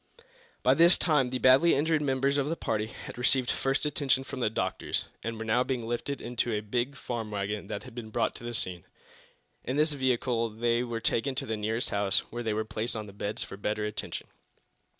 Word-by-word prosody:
By 130 - +6
this 170 +5 +7
time 150 -7 +2
the 130 - -1
badly 130 +7 +6
injured 155 +2 +2
members 140 0 +1
of 140 +1 0
the 165 - 0
party 110 -7 -1
had 110 - -9
received 125 0 +3
first 135 +2 0
attention 140 -3 +1
from 135 - -7
the 120 - +2
doctors, 110 - -2 0.2
and 115 0 -3
were 110 - -5
now 120 +3 +3
being 125 -3 -2
lifted 120 +4 -2
into 120 0 -1
a 105 -1 0
big 120 +6 -1
farm 115 -5 -4
wagon 100 0 -3
that 100 - -4
had 125 - -11
been 115 -2 -7
brought - - 0
to - - -13
the 120 0 -4
scene. 90 -5 -1 0.8
In 130 - -2
this 155 0 +3
vehicle 125 -3 +1
they 115 +2 +1
were 120 -2 -4
taken 130 +5 +1
to 135 0 -3
the 110 - -2
nearest 110 +2 -2
house, 100 -1 +2
where 120 - -4
they 110 -2 -1
were 110 +1 -1
placed 110 +2 -3
on 110 -1 -4
beds 100 +1 -3
for 95 - -9
better 105 +1 -1
attention. 105 0 -5
120 Hz, 210 wpm, -29 LUFS, 110-135 Hz, 0.8 s, this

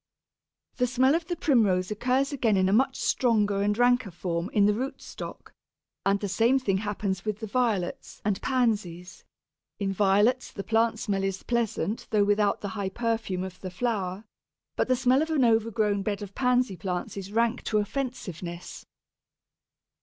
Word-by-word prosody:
The 250 - +2
smell 255 +3 +3
of 330 0 -1
the 350 - -2
Primrose 210 - +2
occurs 255 +6 +1
again 230 -7 +2
in 185 0 +3
a 190 - +2
much 265 +4 +2
stronger 210 -5 +2
and 205 +1 +1
ranker 245 -2 +3
form 170 0 -3
in 205 -1 +4
the 210 - +4
root 260 +6 -4
stock, - - -9 0.5
and 200 0 +3
the 205 - -3
same 230 +7 +3
thing 205 -8 0
happens 200 -3 -3
with 215 -1 -3
the 220 - -4
Violets 215 -5 -1
and 205 -1 0
Pansies; 205 -9 -1 0.5
in 195 -1 -1
Violets 205 +6 +2
the 200 - -6
plant 225 +1 +2
smell 200 -3 -1
is 195 -1 -2
pleasant, 235 -2 -1
though 210 -2 +3
without 205 0 +2
the 205 - -3
high 200 -2 -3
perfume 225 -4 -2
of 185 -1 -7
the 185 - -5
flower; 195 -1 -2 0.5
but - - 0
the 255 - +3
smell 255 +2 +3
of 320 - -1
an 295 -6 +3
overgrown 220 -3 +2
bed 205 +1 -2
of 200 -1 -9
Pansy 250 -4 +1
plants 180 0 -4
is 195 0 -7
rank 230 +2 +1
to 215 - +1
offensiveness. 205 - -4
210 Hz, 170 wpm, -27 LUFS, 195-245 Hz, 0.5 s, in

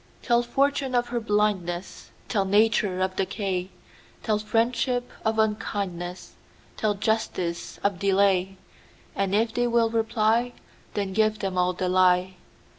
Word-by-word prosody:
Tell 240 -1 +3
fortune 270 +1 0
of 240 0 +1
her 240 0 -1
blindness; 205 -5 -1 0.2
Tell 205 -4 +1
nature 205 -1 +2
of 185 0 -1
decay; 190 -1 -2 0.5
Tell 215 -2 +1
friendship 245 +3 0 0.2
of 220 0 0
unkindness; 195 -5 -2 0.4
Tell 210 -1 0
justice 195 -5 -2
of 200 -3 0
delay; 195 -1 +2 0.6
And 195 0 0
if 225 +1 +1
they 245 0 +1
will 230 -1 +2
reply, 225 +1 +1 0.4
Then 200 -2 -2
give 215 +1 +2
them 195 -2 -3
all 180 0 +2
the 185 +1 -2
lie. 185 0 +3
210 Hz, 130 wpm, -25 LUFS, 185-225 Hz, 0.6 s, Tell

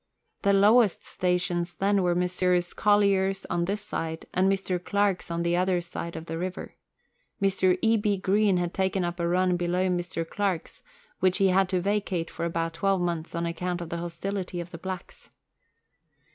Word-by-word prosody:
The 200 - +3
lowest 210 +1 +4
stations 180 -1 -1
then 200 0 +2
were 175 -1 +2
Messrs. 180 0 +1
Collyer's 195 -2 +2
on 170 0 +1
this 200 +3 -2
side, 160 -5 -4
and 190 +1 +3
Mr. 185 -2 -1
Clark's 200 -3 0
on 170 0 -2
the 170 0 +1
other 180 0 +2
side 170 -1 -6
of 160 0 -6
the 165 0 -4
river. 185 +1 -5 0.7
Mr. 190 -2 +2
E. 225 0 +4
B. 205 -1 +1
Green 200 0 +2
had 175 -1 -1
taken 190 -1 0
up 175 +1 -4
a 170 - 0
run 180 +1 +2
below 180 +2 0
Mr. 175 -2 -2
Clark's, 195 -3 -2 0.4
which 185 -1 +2
he 195 -2 +4
had 190 0 +3
to 185 -1 +1
vacate 195 -3 -1
for - - -4
about 165 0 -2
twelve 195 +3 +1
mouths 170 -2 -2
on 170 0 -1
account 175 +1 -2
of 170 -2 -6
the 170 - -3
hostility 180 +2 -4
of 175 0 -6
the 165 - -8
blacks. 185 0 -7
180 Hz, 180 wpm, -27 LUFS, 175-195 Hz, 0.7 s, lowest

